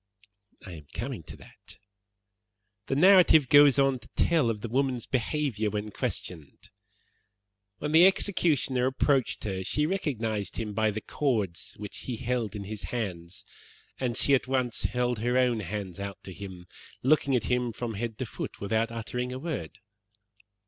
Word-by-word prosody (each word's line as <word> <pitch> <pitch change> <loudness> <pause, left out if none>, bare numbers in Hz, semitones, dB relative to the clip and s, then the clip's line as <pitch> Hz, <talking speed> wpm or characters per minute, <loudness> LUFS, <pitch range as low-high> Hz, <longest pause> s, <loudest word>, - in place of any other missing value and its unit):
"I 95 - -8
am 75 -4 -10
coming 120 -2 -4
to - - -10
that. - - -16 1.1
The 135 - 0
narrative 175 -3 +6
goes 145 -2 +7
on 135 -2 +3
to 120 - -16
tell 160 -8 +3
of 110 -2 -3
the 115 - -4
woman's 130 0 0
behaviour 130 -4 -1
when 105 +1 -4
questioned. 80 -6 -5 1.1
'When 150 +5 -3
the 165 +4 +8
executioner 150 -10 +2
approached 135 -1 +1
her 95 -3 -3
she 150 +10 0
recognized 115 - -2
him 110 -2 -3
by 110 +1 +2
the 110 +1 -3
cords 105 - -2
which 105 -1 -7
he 125 - -5
held 115 -3 -2
in 105 - -5
his 105 +1 -6
hands, 100 -4 -4 0.5
and 125 -3 -1
she 140 - +3
at 130 - +3
once 130 -5 -1
held 125 +3 0
out - - -5
her 125 +1 +2
own 125 -3 +3
hands 100 -2 -5 0.3
to 95 - -8
him, 95 -2 -9 0.4
looking 140 0 +3
at 120 - +1
him 125 +1 0
from 115 +1 -4
head 110 +1 -4
to - - -3
foot - - -7
without 110 +3 0
uttering 125 +2 -4
a 130 - -4
word.' 130 - -5
120 Hz, 165 wpm, -28 LUFS, 105-135 Hz, 1.1 s, the